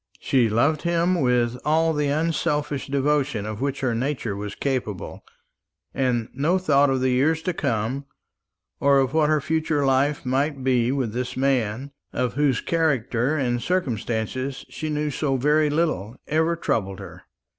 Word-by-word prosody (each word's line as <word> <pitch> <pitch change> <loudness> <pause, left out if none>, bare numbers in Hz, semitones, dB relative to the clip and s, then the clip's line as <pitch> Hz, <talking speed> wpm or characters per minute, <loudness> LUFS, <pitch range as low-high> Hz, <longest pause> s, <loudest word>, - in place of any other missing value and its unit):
She 125 -4 +2
loved 140 +8 +2
him 170 0 +1
with 125 -1 +1
all 160 +1 +2
the 150 -1 0
unselfish 150 -2 -1
devotion 140 -5 0
of 110 +1 -5
which 140 0 -2
her 130 -3 +1
nature 120 -3 -2
was 105 0 -5
capable; 125 -9 -3 0.7
and 125 -4 0
no 160 +7 +1
thought 145 -6 +3
of 130 -1 0
the 130 0 +2
years 155 +5 +2
to 180 - -1
come, 120 0 -2 0.7
or 140 0 +4
of 135 0 +1
what 155 -1 +3
her 155 0 +3
future 155 -1 0
life 135 +2 +1
might 135 +2 0
be 125 -2 +2
with 130 -6 -1
this 125 +1 -3
man, 130 -1 0 0.2
of 125 -2 -1
whose 140 -3 +1
character 140 -4 0
and 120 -3 0
circumstances 130 - -2
she 155 - -5
knew 150 0 -1
so 135 -1 0
very 150 +3 +3
little, 145 - -1
ever 160 +2 +1
troubled 95 - -1
her. - - -10
135 Hz, 155 wpm, -24 LUFS, 125-150 Hz, 0.7 s, or